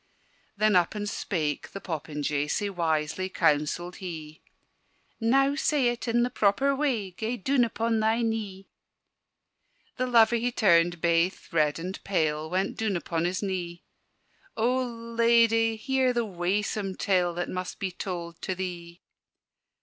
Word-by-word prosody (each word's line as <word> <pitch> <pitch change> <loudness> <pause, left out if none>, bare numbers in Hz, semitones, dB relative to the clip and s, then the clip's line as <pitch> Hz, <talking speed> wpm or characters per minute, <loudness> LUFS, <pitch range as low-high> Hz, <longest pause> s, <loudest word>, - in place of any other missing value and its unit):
Then 215 -1 +3
up 175 +3 +3
and 205 0 -3
spake 155 -8 -3
the 195 - -5
popinjay, 150 -4 -3
Sae 205 +4 -1
wisely 165 +1 -1
counselled 165 +1 0
he. 160 -4 -8 0.8
"Now 270 +4 +3
say 285 -3 +2
it 240 +1 -4
in 240 +1 +2
the 250 - -1
proper 265 +7 +2
way: 250 -9 -1
Gae 220 +6 -3
doon 260 +4 +2
upon 230 0 0
thy 220 +2 +2
knee!" 210 -4 -3 1.3
The 255 - 0
lover 235 -1 +5
he 245 +2 -1
turned 175 -6 +3
baith 170 +2 +1
red 150 -3 +2
and 180 +3 -6
pale, 155 -5 0
Went 190 +3 -1
doon 220 -3 0
upon 170 -1 -2
his 185 +3 -1
knee: 175 -3 -4 0.7
"O 240 +3 +2
Ladye, 230 -1 +2
hear 260 +2 +1
the 235 -1 0
waesome 195 +1 -2
tale 180 -3 +1
That 175 0 -3
must 185 0 -4
be 190 -1 -3
told 170 -2 -6
to 185 - -2
thee! 175 -2 -6
195 Hz, 140 wpm, -27 LUFS, 170-230 Hz, 1.3 s, lover